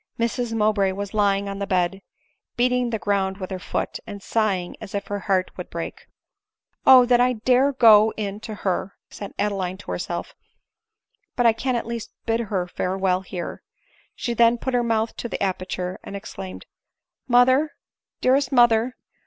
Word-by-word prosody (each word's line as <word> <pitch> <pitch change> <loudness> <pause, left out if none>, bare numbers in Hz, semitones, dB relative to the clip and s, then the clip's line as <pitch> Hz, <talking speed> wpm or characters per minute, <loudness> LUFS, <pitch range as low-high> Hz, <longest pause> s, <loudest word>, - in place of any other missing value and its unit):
Mrs 235 +1 -1
Mowbray 210 -3 +2
was 200 0 -5
lying 200 -1 +2
on 195 0 -5
the 200 - -3
bed, 185 +1 0 0.6
beating 250 0 +2
the 225 - -1
ground 195 -2 0
with 185 -2 -6
her 185 - -3
foot, - - -3
and 200 -1 -8
sighing 200 -6 0
as 210 -2 -7
if 200 - -2
her 205 0 -3
heart 185 -1 +1
would - - -7
break. - - -6 0.4
" - - -51
O! 255 -2 +9
that 245 0 +4
I 250 +1 +3
dare 255 +4 +3
go 220 -4 +6
in 205 -1 -3
to 215 0 -7
her 190 +1 -1
!" - - -67
said 200 - -8
Adeline 190 -3 -1
to 205 - -8
her - - -2
self; - - -4 0.5
" 440 -1 -52
but 245 - +1
I 230 - +6
can 250 +3 -1
at 235 - -2
least 235 -1 -6
bid 225 0 +1
her 195 -5 -1
farewell 185 +1 0
here." 180 -2 -6 0.5
She 240 - -2
then 235 +1 +4
put 260 +2 -3
her 245 - +3
mouth 225 -1 0
to 235 - -4
the - - -3
aperture, 185 -1 -3
and 200 - -8
exclaimed, 195 -1 -8 0.4
" - - -65 0.2
Mother, 260 +4 +4 0.5
dearest 270 +3 +3
mother 240 -1 +4
215 Hz, 185 wpm, -23 LUFS, 195-240 Hz, 0.6 s, O